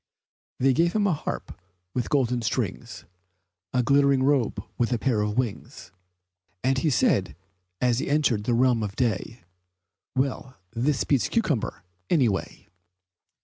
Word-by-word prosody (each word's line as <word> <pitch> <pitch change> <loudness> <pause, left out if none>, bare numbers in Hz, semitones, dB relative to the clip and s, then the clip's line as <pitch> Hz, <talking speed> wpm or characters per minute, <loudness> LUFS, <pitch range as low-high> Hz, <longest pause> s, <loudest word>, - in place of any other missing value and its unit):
They 135 +1 +4
gave 170 +6 +2
him 210 -1 +2
a 195 - +3
harp 145 - -5 0.3
with 125 -3 -2
golden 125 -4 +1
strings, 110 - -3 0.7
A 125 - +1
glittering 140 0 +3
robe 130 -7 +1
with 120 0 0
a 120 - +2
pair 115 -3 +1
of 105 +1 -2
wings, 120 -5 -4 0.7
And 130 +1 +2
he 155 - +1
said, 95 - +2 0.4
as 125 -1 +2
he - - -3
entered 140 -8 +1
the 120 - +2
Realm 125 -1 +3
of 105 -2 -4
Day, 115 -1 -2 0.7
"Well, 135 0 -2 0.2
this 130 +4 +1
beats 140 -4 +1
cucumber, 150 - -1 0.3
any 140 -8 +4
way!" 95 - -5
125 Hz, 145 wpm, -25 LUFS, 115-140 Hz, 0.7 s, They